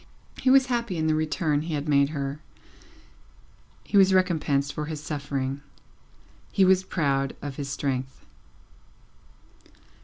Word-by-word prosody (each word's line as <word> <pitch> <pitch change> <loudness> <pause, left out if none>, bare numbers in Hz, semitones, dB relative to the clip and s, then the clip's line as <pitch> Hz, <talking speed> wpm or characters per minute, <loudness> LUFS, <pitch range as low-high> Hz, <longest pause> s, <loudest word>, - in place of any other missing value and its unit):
He 260 - +2
was 265 0 +6
happy 235 -7 -2
in 160 - -1
the 155 - +2
return 155 -1 0
he 160 0 -3
had 145 +1 -4
made 140 -1 +3
her, 140 -1 -4 1.4
he 205 - 0
was 190 -1 +6
recompensed 150 -7 +1
for 150 - -4
his 155 0 -5
suffering, 140 -2 -4 0.9
he 195 - +4
was 185 0 +5
proud 140 -7 -1
of 140 -2 -7
his 140 -2 -4
strength. 130 -2 -3
150 Hz, 130 wpm, -26 LUFS, 140-180 Hz, 1.4 s, was